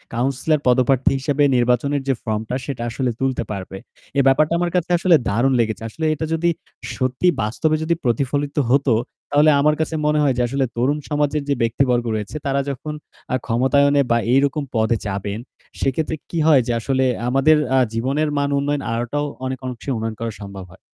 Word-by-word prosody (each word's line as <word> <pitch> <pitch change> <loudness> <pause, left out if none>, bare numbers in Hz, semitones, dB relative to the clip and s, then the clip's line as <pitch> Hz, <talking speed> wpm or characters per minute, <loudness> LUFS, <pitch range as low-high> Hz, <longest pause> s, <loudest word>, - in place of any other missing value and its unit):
Councillor 135 +5 0
পদপ্রার্থী 130 +1 +3
হিসেবে 145 +2 +1
নির্বাচনের 125 +4 +1
যে 135 - +3
ফর্মটা, 110 +3 -2
সেটা 135 -5 -5
আসলে 130 +2 -1
তুলতে 130 -2 0
পারবে। 95 -1 -6 0.4
এ - - +6
ব্যাপারটা 150 +4 +3
আমার 175 -1 0
কাছে 180 -1 0
আসলে 170 -1 +4
দারুণ 120 +6 +2
লেগেছে। 110 0 0
আসলে 160 +7 -4
এটা 155 +1 -3
যদি 170 +1 +1 0.5
সত্যি 130 +6 0
বাস্তবে 155 +9 0
যদি 170 +1 +1
প্রতিফলিত 140 +4 -1
হতো, 135 -1 +3 0.4
তাহলে 150 +2 +5
আমার 150 +1 +3
কাছে 160 +1 -2
মনে 150 0 +2
হয় 135 -3 +3
যে, - - +2
আসলে 135 +2 0
তরুণ 135 +5 +1
সমাজের 150 0 0
যে - - +3
ব্যক্তিবর্গ 120 +1 +1
রয়েছে, 105 +6 -5
তারা 140 0 +1
যখন 140 +3 -5 0.4
আ - - +3
ক্ষমতায়নে 140 +4 +3
বা 115 - +4 0.2
এই 135 - +6
রকম 145 +2 -2
পদে 110 +1 +2
যাবেন, 100 +1 -3 0.4
সে - - +2
ক্ষেত্রে 160 0 -1
কী 170 - -4
হয় 145 -5 +6
যে, - - 0
আসলে 130 +3 0 0.2
আমাদের 135 +4 +4 0.2
আ - - +5
জীবনের 135 +7 0
মান 140 0 +1
উন্নয়ন 140 0 -1
আনাটাও 120 +6 -2 0.2
অনেক 130 0 -3
অংশে 125 +2 -7
উন্নয়ন 110 0 -3
করা 115 -1 -3
সম্ভব 100 -1 -8
হয়। 95 - -17
135 Hz, 185 wpm, -21 LUFS, 120-145 Hz, 0.5 s, এ